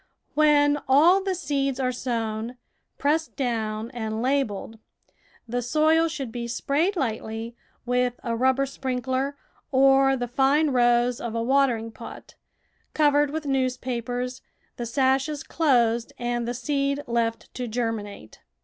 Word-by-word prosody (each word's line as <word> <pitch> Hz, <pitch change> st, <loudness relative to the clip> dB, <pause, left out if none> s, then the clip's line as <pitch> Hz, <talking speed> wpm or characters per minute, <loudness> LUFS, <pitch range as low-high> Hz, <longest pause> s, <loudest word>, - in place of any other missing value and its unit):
AVhen 290 Hz, -1 st, +4 dB
all 330 Hz, +9 st, +6 dB
the 385 Hz, -1 st, -1 dB
seeds 275 Hz, -5 st, -1 dB
are 255 Hz, -1 st, +1 dB
sown, 230 Hz, -1 st, -3 dB, 0.4 s
pressed 315 Hz, +3 st, 0 dB
down, 225 Hz, -3 st, -2 dB
and 220 Hz, -3 st, -4 dB
labelled, 230 Hz, -4 st, -1 dB, 0.7 s
the 245 Hz, +2 st, -2 dB
soil 315 Hz, +6 st, +3 dB
should 275 Hz, -6 st, -5 dB
be 235 Hz, 0 st, -4 dB
sprayed 295 Hz, -, 0 dB
lightly 225 Hz, -4 st, -3 dB, 0.3 s
with 250 Hz, 0 st, 0 dB
a 230 Hz, -1 st, -1 dB
rubber 260 Hz, +3 st, +2 dB
sprin 260 Hz, -2 st, -4 dB
kler 265 Hz, +2 st, -1 dB, 0.4 s
or 270 Hz, 0 st, +5 dB
the 245 Hz, -1 st, -3 dB
fine 275 Hz, +5 st, +2 dB
rose 240 Hz, -1 st, +3 dB
of 235 Hz, -1 st, -4 dB
a 230 Hz, -, 0 dB
watering 245 Hz, -3 st, +2 dB
pot, -, -, -11 dB, 0.6 s
covered 295 Hz, -1 st, +4 dB
with 310 Hz, +1 st, -4 dB
newspapers, 250 Hz, -2 st, -2 dB, 0.3 s
the 240 Hz, -, -4 dB
sashes 270 Hz, +4 st, +1 dB
closed, 240 Hz, -7 st, +1 dB
and 240 Hz, -1 st, -2 dB
the 240 Hz, -, -2 dB
seed 280 Hz, +2 st, -1 dB
left 230 Hz, -1 st, -2 dB
to 250 Hz, -1 st, -4 dB
germinate. 220 Hz, -, -4 dB
255 Hz, 130 wpm, -25 LUFS, 235-280 Hz, 0.7 s, all